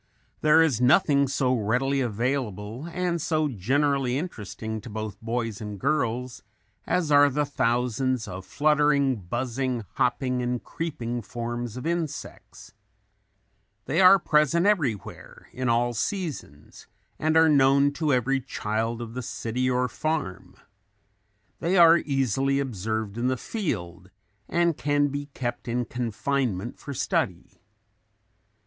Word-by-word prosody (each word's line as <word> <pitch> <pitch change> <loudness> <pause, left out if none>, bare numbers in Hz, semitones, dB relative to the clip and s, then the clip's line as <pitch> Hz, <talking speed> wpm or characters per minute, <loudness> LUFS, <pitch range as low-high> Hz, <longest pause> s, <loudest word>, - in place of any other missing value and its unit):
There 155 +1 +6
is 135 -8 +1
nothing 140 +1 +4
so 130 -1 +1
readily 125 +5 +1
available 120 - -2
and 175 -1 -1
so 155 -1 +1
generally 135 +3 0
interesting 110 - -5
to 120 - -10
both 110 -1 -6
boys 115 -2 -3
and 105 -2 -6
girls 125 -2 -1 0.5
as 175 -4 0
are 145 0 +7
the 145 +2 0
thousands 125 -2 0
of 95 +1 -7
fluttering, 145 +2 +2
buzzing, 120 +5 -3
hopping 125 0 +1
and 125 0 -2
creeping 120 -8 -4
forms 120 +1 -5
of 125 - -6
insects. 165 -4 -5 1.1
They 160 +7 +1
are 185 +1 +9
present 160 0 +2
everywhere, 140 - -2
in 130 -1 -2
all 120 +1 +2
seasons 145 - -5 0.3
and 155 +1 +2
are 160 0 +6
known 140 -1 +4
to 150 +1 -1
every 135 +1 +1
child 115 +1 -3
of 115 -1 -9
the 125 - -4
city 125 +2 -2
or 125 0 +1
farm. 155 - -3 1.0
They 180 +3 +1
are 170 -1 +8
easily 135 -1 0
observed 110 -3 -3
in 120 - +1
the 130 0 0
field 95 - -4 0.4
and 170 -1 +2
can 145 0 +1
be 145 +1 -4
kept 120 -1 -4
in 120 +1 -1
confinement 120 -2 -2
for 145 - -8
study. - - -2
130 Hz, 130 wpm, -26 LUFS, 115-145 Hz, 1.1 s, are